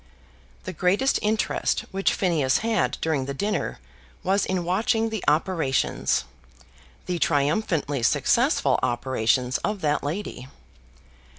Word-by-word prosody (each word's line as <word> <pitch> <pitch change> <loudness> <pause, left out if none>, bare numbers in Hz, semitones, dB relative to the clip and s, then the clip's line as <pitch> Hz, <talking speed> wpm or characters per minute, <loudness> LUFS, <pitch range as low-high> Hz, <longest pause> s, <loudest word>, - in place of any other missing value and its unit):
The 185 - -6
greatest 190 - +2
interest 215 +1 0
which 195 0 +1
Phineas 155 -8 +2
had 225 -4 +1
during 155 -5 0
the 140 +1 -5
dinner 210 +8 -2 0.5
was 195 +1 +1
in 185 -2 -1
watching 225 +6 +1
the 220 -3 -4
operations, 155 -3 +1 0.8
the 180 -1 -2
triumphantly 145 - 0
successful 115 - +2
operations 125 +1 0
of 210 -2 -3
that 150 -1 0
lady. 145 -4 -5
170 Hz, 110 wpm, -25 LUFS, 140-205 Hz, 0.8 s, greatest